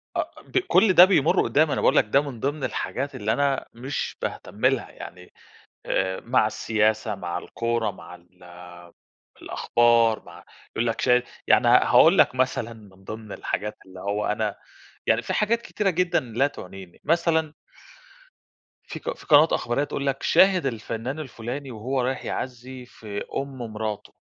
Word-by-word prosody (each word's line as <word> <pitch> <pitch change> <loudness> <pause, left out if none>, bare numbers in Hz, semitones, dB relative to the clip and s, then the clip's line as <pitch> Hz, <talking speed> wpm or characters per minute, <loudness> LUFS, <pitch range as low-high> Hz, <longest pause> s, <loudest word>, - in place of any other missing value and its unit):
آه، - - -2
ب - - -4
كل 225 - +4
ده 180 - +10
بيمرّ 165 -6 +3
قدّامي 155 +1 +2
أنا - - -1
باقول - - +3
لك - - +5
ده 135 +6 +3
من 140 -5 -7
ضمن 140 +3 -2
الحاجات 140 +2 -3
اللي 105 +1 -1
أنا 140 -1 0
مش 130 +5 -4
باهتم - - -4
لها - - +1
يعني، 90 0 -11 0.5
آآ، 95 0 -1
مع 120 -2 +2
السياسة، 110 0 0
مع 90 -2 -4
الكورة 115 +1 -2
مع 90 - -12
ال 90 0 -16 0.8
الأخبار، 115 -1 +2
مع - - -14 0.3
يقول 115 +1 0
لك 115 - -2
شايف 125 -1 +3 0.2
يعني - - +4
هاقول - - +6
لك - - +4
مثلًا، 125 -3 -1
من 100 -4 -17
ضمن 110 +1 -8
الحاجات 105 0 -4
اللي 95 -1 -13
هو 100 +2 -2
أنا 105 -1 -1 0.5
يعني 110 +1 +2
في - - -4
حاجات 230 +2 +1
كتيرة 210 -3 -1
جدًا 180 0 +1
لا 125 +3 0
تعنيني، 95 -8 -11
مثلًا 160 -2 +1 1.3
في - - -7
قن - - -4
في - - -16
قنوات 155 +1 +6
إخبارية 120 +4 0
تقول 140 -1 -4
لك 135 0 -2
شاهد 190 -4 +4
الفنّان 115 +3 -4
الفلاني، 130 0 -6
وهو 125 +4 -2
رايح 130 +2 -2
يعزي 125 0 -6
في 105 -4 -7
أم 135 -1 -5
مراتُه، 110 -3 -5
120 Hz, 160 wpm, -24 LUFS, 105-140 Hz, 1.3 s, ده